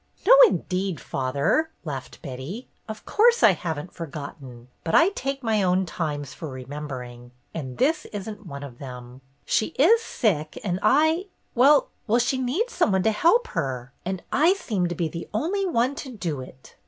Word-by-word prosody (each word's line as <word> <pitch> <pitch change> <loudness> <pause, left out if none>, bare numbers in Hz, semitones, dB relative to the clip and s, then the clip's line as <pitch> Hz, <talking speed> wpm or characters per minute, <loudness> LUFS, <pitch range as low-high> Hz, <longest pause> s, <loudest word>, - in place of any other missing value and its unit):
"No, 475 - +8
indeed, 185 - -2
father 140 - 0
!" - - -38
laughed 135 -4 -7
Betty. 140 - -7 0.2
"Of 215 0 -7
course 475 +2 +4
I 215 - +9
have 170 -3 -3
n't 165 +5 -9
forgotten; 140 -6 -8
but 165 - 0
I 335 - +6
take 275 -8 -4
my 220 -2 +2
own 185 0 +2
times 145 -5 -4
for 155 +3 -7
remembering, 130 -2 -7 0.2
and 130 -6 -6
this 310 +4 +1
is 205 -1 -6
n't 210 -2 -8
one 140 -2 -7
of 125 -4 -10
them. 125 -1 -9 0.2
She 215 - 0
is 435 - +5
sick 160 - -1
and 180 -2 -1
I 315 - +3
— - - -44
well, 275 +3 +5 0.3
she 255 +2 +1
needs 305 - -1
some - - +2
one 190 -1 +2
to 220 - +3
help 455 - +3
her, 130 - -3
and 185 0 -4
I 325 +6 +4
seem 210 - -1
to 175 - -4
be 165 0 -1
the 165 +2 -7
only 375 - 0
one 255 -5 +1
to 285 - -6
do 170 - -4
it." 130 0 -13
180 Hz, 185 wpm, -25 LUFS, -, 0.3 s, I